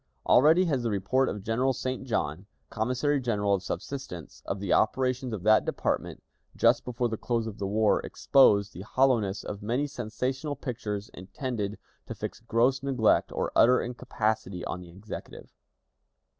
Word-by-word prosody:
Already 160 Hz, +8 st, +5 dB
has 140 Hz, -7 st, 0 dB
the 120 Hz, -, -1 dB
report 110 Hz, +7 st, +1 dB
of 100 Hz, -1 st, -5 dB
General 125 Hz, +5 st, +1 dB
St. 130 Hz, +1 st, -4 dB
John, 95 Hz, -5 st, -2 dB, 0.2 s
Commissary 125 Hz, +6 st, 0 dB
General 105 Hz, -5 st, +1 dB
of 95 Hz, -, +1 dB
Subsistence, 95 Hz, -, -6 dB
of 95 Hz, -, -2 dB
the 100 Hz, -3 st, 0 dB
operations 130 Hz, -1 st, +1 dB
of 105 Hz, -5 st, -5 dB
that 110 Hz, +1 st, +5 dB
department, -, -, -2 dB, 0.3 s
just -, -, +3 dB
before 125 Hz, 0 st, -1 dB
the 110 Hz, -1 st, -3 dB
close 115 Hz, -1 st, -1 dB
of 110 Hz, -1 st, -7 dB
the 100 Hz, -, -2 dB
war, 105 Hz, +1 st, +2 dB
exposed 100 Hz, -7 st, +4 dB
the 90 Hz, -, -8 dB
hollowness 110 Hz, -4 st, +1 dB
of 100 Hz, -, -6 dB
many 120 Hz, +7 st, 0 dB
sensational 130 Hz, +2 st, -3 dB
pictures 105 Hz, -6 st, -5 dB
intended 105 Hz, +2 st, -4 dB, 0.3 s
to -, -, -6 dB
fix -, -, -6 dB
gross 120 Hz, +3 st, +1 dB
neglect 130 Hz, -5 st, +2 dB
or -, -, -2 dB
utter 125 Hz, +2 st, +6 dB
incapacity 110 Hz, -6 st, -2 dB
on 90 Hz, -, -4 dB
the 90 Hz, -, -12 dB
Executive. 95 Hz, +5 st, -9 dB
115 Hz, 155 wpm, -28 LUFS, 100-130 Hz, 0.3 s, utter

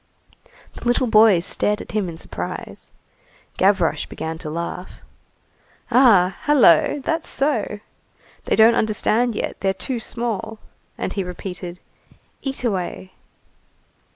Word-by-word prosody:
The -, -, -12 dB
little 245 Hz, +2 st, +2 dB
boys 215 Hz, -6 st, +5 dB
stared 210 Hz, +1 st, +1 dB
at -, -, -9 dB
him 210 Hz, -4 st, -1 dB
in 165 Hz, -, -8 dB
surprise. -, -, -6 dB, 0.7 s
Gavroche 190 Hz, -3 st, +2 dB
began 160 Hz, 0 st, -6 dB
to 155 Hz, -, -5 dB
laugh. 170 Hz, +3 st, -5 dB, 1.0 s
"Ah! 200 Hz, -8 st, +5 dB
hullo, 275 Hz, -, +5 dB
that's 325 Hz, 0 st, -1 dB
so! 270 Hz, -7 st, -1 dB, 0.7 s
they -, -, +1 dB
don't 220 Hz, +1 st, +6 dB
understand 220 Hz, +2 st, +1 dB
yet, -, -, -3 dB
they're 195 Hz, 0 st, 0 dB
too 255 Hz, -3 st, -3 dB
small." 225 Hz, -1 st, -3 dB, 0.4 s
And -, -, -3 dB
he 195 Hz, -, -2 dB
repeated:— 180 Hz, -1 st, -7 dB, 0.6 s
"Eat 270 Hz, -2 st, -4 dB
away." 190 Hz, -4 st, -3 dB
210 Hz, 120 wpm, -21 LUFS, 180-235 Hz, 1.0 s, don't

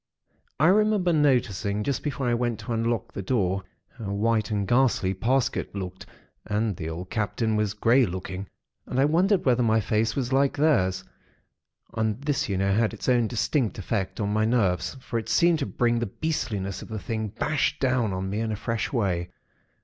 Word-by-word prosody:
"I 155 Hz, -, +4 dB
remember 205 Hz, -3 st, +3 dB
noticing, 115 Hz, -, +1 dB
just 140 Hz, +1 st, -1 dB
before 140 Hz, -3 st, -2 dB
I 120 Hz, -, +2 dB
went 120 Hz, -2 st, -1 dB
to 110 Hz, +3 st, -4 dB
unlock 115 Hz, -1 st, -1 dB
the -, -, -4 dB
door, 95 Hz, -3 st, 0 dB, 0.4 s
how 100 Hz, -3 st, -4 dB
white 110 Hz, +2 st, +1 dB
and 100 Hz, -2 st, -1 dB
ghastly 120 Hz, -5 st, +2 dB
Parsket 125 Hz, +4 st, 0 dB
looked 95 Hz, -1 st, -6 dB, 0.4 s
and 105 Hz, -1 st, -1 dB
the 80 Hz, -1 st, -5 dB
old 90 Hz, +3 st, -7 dB
Captain 110 Hz, +1 st, 0 dB
was 105 Hz, -1 st, 0 dB
grey 120 Hz, +4 st, +4 dB
looking; 95 Hz, +2 st, -5 dB, 0.4 s
and 125 Hz, -, -2 dB
I 135 Hz, -, +5 dB
wondered 180 Hz, +5 st, +2 dB
whether 125 Hz, -2 st, +3 dB
my 110 Hz, -1 st, +3 dB
face 110 Hz, +2 st, 0 dB
was 130 Hz, -2 st, -1 dB
like 135 Hz, +1 st, +2 dB
theirs. 95 Hz, -12 st, +2 dB, 0.9 s
And 110 Hz, 0 st, -1 dB
this, 145 Hz, -4 st, -1 dB
you 95 Hz, -, 0 dB
know, 95 Hz, +1 st, +1 dB
had 110 Hz, +1 st, +1 dB
its -, -, -7 dB
own 120 Hz, -3 st, +3 dB
distinct 120 Hz, +1 st, 0 dB
effect 95 Hz, -1 st, -2 dB
upon 105 Hz, -1 st, -1 dB
my 110 Hz, 0 st, +2 dB
nerves; 95 Hz, -, +1 dB
for 115 Hz, -2 st, -3 dB
it 110 Hz, -, -7 dB
seemed 170 Hz, -2 st, +4 dB
to 140 Hz, -, -2 dB
bring 120 Hz, -1 st, +1 dB
the 120 Hz, -, -1 dB
beastliness 105 Hz, -8 st, -3 dB
of -, -, -9 dB
the 110 Hz, -, -5 dB
thing 110 Hz, +1 st, -3 dB
bash 145 Hz, +8 st, -1 dB
down 125 Hz, -5 st, +1 dB
on 95 Hz, 0 st, -3 dB
me 100 Hz, +3 st, -2 dB
in 110 Hz, -1 st, -1 dB
a -, -, -1 dB
fresh 115 Hz, +2 st, -2 dB
way. 95 Hz, -8 st, 0 dB
110 Hz, 190 wpm, -26 LUFS, 100-130 Hz, 0.9 s, I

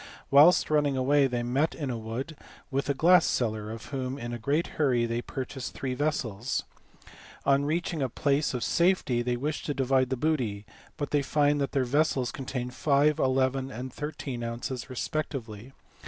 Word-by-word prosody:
Whilst 150 Hz, +4 st, +6 dB
running 145 Hz, -3 st, +2 dB
away 140 Hz, +2 st, +3 dB
they 120 Hz, -2 st, -2 dB
met 135 Hz, +6 st, 0 dB
in 140 Hz, -5 st, -3 dB
a 120 Hz, -, -3 dB
wood 115 Hz, +8 st, -5 dB, 0.4 s
with 140 Hz, +1 st, -1 dB
a 140 Hz, -, +1 dB
glass 175 Hz, +6 st, +6 dB
seller 110 Hz, -3 st, -1 dB
of 115 Hz, 0 st, -7 dB
whom 130 Hz, 0 st, -3 dB
in 120 Hz, -3 st, -5 dB
a 120 Hz, -, -4 dB
great 145 Hz, +8 st, +1 dB, 0.2 s
hurry 125 Hz, -5 st, +3 dB
they 115 Hz, +1 st, -2 dB
purchased 130 Hz, +1 st, -6 dB
three 130 Hz, -2 st, -3 dB
vessels. 125 Hz, -5 st, -1 dB, 0.8 s
On 140 Hz, +1 st, +3 dB
reaching 160 Hz, +1 st, -1 dB
a 130 Hz, -, 0 dB
place 140 Hz, +3 st, 0 dB
of 125 Hz, -, -2 dB
safety 170 Hz, -9 st, +2 dB
they 120 Hz, 0 st, -1 dB
wish 150 Hz, +4 st, -2 dB
to 145 Hz, -, -2 dB
divide 130 Hz, -1 st, +2 dB
the 130 Hz, -, -1 dB
booty, 120 Hz, -8 st, -1 dB, 0.3 s
but 145 Hz, -2 st, -3 dB
they 145 Hz, -, +3 dB
find 145 Hz, +1 st, +2 dB
that 140 Hz, -, -2 dB
their 135 Hz, -, +2 dB
vessels 135 Hz, -2 st, +1 dB
contain 125 Hz, -2 st, -4 dB
5, 145 Hz, +3 st, +2 dB
11, 130 Hz, 0 st, +1 dB
and 130 Hz, 0 st, -7 dB
13 145 Hz, -4 st, -5 dB
ounces 120 Hz, +2 st, -4 dB
respectively. 125 Hz, -4 st, -4 dB
135 Hz, 175 wpm, -28 LUFS, 120-145 Hz, 0.8 s, Whilst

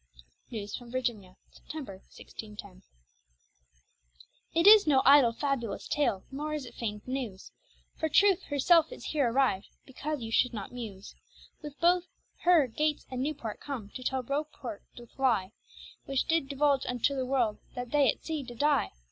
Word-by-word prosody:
NEWES 210 Hz, -2 st, -5 dB
FROM 245 Hz, -1 st, -12 dB
VIRGINIA 230 Hz, -8 st, -3 dB
[September, 275 Hz, -11 st, -8 dB
1610] 205 Hz, -3 st, -11 dB, 1.7 s
It 335 Hz, +1 st, +3 dB
is 415 Hz, -3 st, +9 dB
no 270 Hz, -3 st, +4 dB
idle 275 Hz, -4 st, +7 dB
fabulous 240 Hz, -3 st, -3 dB
tale, 270 Hz, -10 st, 0 dB
nor 300 Hz, +3 st, -3 dB
is 295 Hz, -3 st, -5 dB
it -, -, -11 dB
fayned 210 Hz, -2 st, -5 dB
newes: 250 Hz, -8 st, -5 dB, 0.5 s
For 315 Hz, -, -1 dB
Truth 390 Hz, +4 st, +4 dB
herself 315 Hz, -, +3 dB
is -, -, -9 dB
heere 285 Hz, -6 st, +2 dB
arriv'd, 245 Hz, -6 st, +1 dB, 0.2 s
because 290 Hz, +2 st, -5 dB
you 225 Hz, -, -6 dB
should 245 Hz, +1 st, +2 dB
not 200 Hz, -2 st, -6 dB
muse. 215 Hz, -6 st, -8 dB, 0.5 s
With 295 Hz, -2 st, -9 dB
her 355 Hz, +1 st, +5 dB, 0.7 s
both 225 Hz, -, -21 dB
Gates 305 Hz, -1 st, 0 dB
and 255 Hz, -1 st, -3 dB
Newport 270 Hz, -6 st, -4 dB
come, 250 Hz, -8 st, -6 dB
to 255 Hz, -, -8 dB
tell 260 Hz, 0 st, -1 dB
Report 275 Hz, -5 st, -4 dB
doth 240 Hz, +2 st, -14 dB
lye, 220 Hz, -8 st, +2 dB, 0.5 s
Which 270 Hz, -1 st, 0 dB
did 325 Hz, -4 st, +1 dB
divulge 280 Hz, -1 st, +1 dB
unto 250 Hz, +3 st, 0 dB
the 260 Hz, -, -1 dB
world, 245 Hz, -5 st, +1 dB, 0.2 s
that 245 Hz, -1 st, -5 dB
they 285 Hz, -5 st, +4 dB
at -, -, -13 dB
sea 315 Hz, -2 st, -3 dB
did 240 Hz, -3 st, -10 dB
dye. 290 Hz, -, +2 dB
260 Hz, 160 wpm, -29 LUFS, 225-295 Hz, 1.7 s, is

